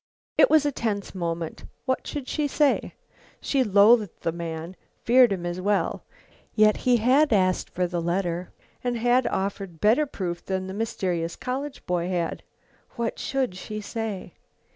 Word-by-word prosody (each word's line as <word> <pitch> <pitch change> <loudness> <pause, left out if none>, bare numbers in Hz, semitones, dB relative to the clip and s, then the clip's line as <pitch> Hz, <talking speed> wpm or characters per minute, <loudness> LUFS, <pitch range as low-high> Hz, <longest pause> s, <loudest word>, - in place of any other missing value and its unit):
It - - +6
was 310 -2 +5
a 290 - +2
tense 210 -6 -3
moment. 170 -3 -4 0.2
What 260 -1 -1
should 285 -3 -5
she 300 -2 0
say? 290 0 +1 0.4
She 275 -2 +1
loathed 210 -1 +4
the 165 - 0
man; 165 +1 -6 0.3
feared 245 0 +6
him, 180 -3 -2
as 175 +1 -3
well. 205 +1 0 0.5
Yet 215 -1 +5
he 250 -1 +3
had 260 +6 +4
asked 185 -3 +2
for 180 - -1
the 175 -1 -2
letter 175 0 -2 0.3
and 245 -1 -1
had 245 +2 +3
offered 195 -3 -3
better 235 - +3
proof 175 -9 -4
than 190 -1 -2
the 190 - -6
mysterious 185 -6 -2
college 270 +3 -5
boy 180 0 -1
had. 175 -2 -2 0.5
What 235 -1 -2
should 265 -6 -1
she 215 +3 -6
say? 215 -2 -5
205 Hz, 160 wpm, -25 LUFS, 180-245 Hz, 0.5 s, It